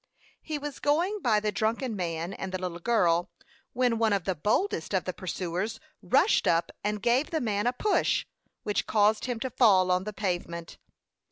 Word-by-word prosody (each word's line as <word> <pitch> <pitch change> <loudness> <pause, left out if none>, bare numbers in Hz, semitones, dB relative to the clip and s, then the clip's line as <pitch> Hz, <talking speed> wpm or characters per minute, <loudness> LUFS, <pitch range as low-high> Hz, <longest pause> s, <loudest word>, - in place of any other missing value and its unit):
He 310 -2 -4
was 290 -1 -6
going 345 +8 +1
by 220 -4 +3
the 210 0 -1
drunken 225 +3 -1
man 170 -1 -3
and 190 - -5
the 185 - -2
little 180 -2 -4
girl, 175 -3 +2 0.4
when 245 -2 +1
one 220 -2 +3
of 195 -3 0
the 190 - 0
boldest 210 - 0
of - - +1
the - - -4
pursuers 190 +5 -3 0.2
rushed 285 - +3
up 165 0 +2
and 210 0 -2
gave 245 +5 +2
the 320 - -1
man 210 -3 -1
a 245 - +2
push, 420 +11 +1 0.4
which 210 - -1
caused 215 0 +3
him 245 -3 -3
to 260 - -2
fall 190 -7 +4
on 180 +1 +1
the 210 - -3
pavement. 175 -4 -4
210 Hz, 185 wpm, -28 LUFS, 185-245 Hz, 0.4 s, fall